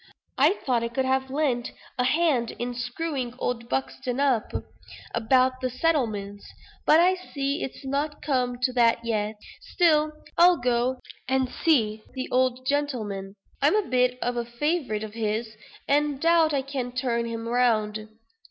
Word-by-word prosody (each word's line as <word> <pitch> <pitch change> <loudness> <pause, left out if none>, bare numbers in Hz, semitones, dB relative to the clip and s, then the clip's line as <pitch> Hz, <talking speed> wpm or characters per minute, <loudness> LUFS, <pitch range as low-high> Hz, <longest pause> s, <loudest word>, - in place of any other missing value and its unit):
"I - - +5
thought 245 -3 +2
I - - 0
could 260 +3 -1
have 265 0 0
lent 265 -4 -1 0.3
a 250 - +3
hand 275 -4 +1
in 245 +1 -3
screwing 250 +1 -3
old 235 -2 -3
Buxton 265 -1 -2
up 265 -6 +1 0.6
about 255 +3 +2
the 255 - 0
settlements; 225 -9 -1 0.4
but 310 - +7
I 360 +2 +5
see 285 -5 -3
it's 270 - -6
not 285 +2 -2
come 250 -4 0
to 255 -1 +2
that 235 -1 +3
yet. 215 -1 -1 0.3
Still 310 -4 +2 0.3
I'll 350 0 +7
go 245 0 +1 0.3
and 260 0 +1
see 225 -8 +1
the 260 0 -3
old 255 0 +1
gentleman. 220 -9 -2 0.3
I'm 290 +8 +4
a 425 -3 +1
bit 250 0 +2
of 245 0 -1
a 240 - 0
favorite 240 -2 -1
of 215 -1 -7
his, 220 0 -2 0.3
and 290 +1 +2
I - - -11
doubt 330 +1 +4
I 275 -2 0
can 260 -3 -4
turn 245 -2 -1
him 230 0 -5
round." 220 -3 +1
255 Hz, 160 wpm, -26 LUFS, 235-285 Hz, 0.6 s, but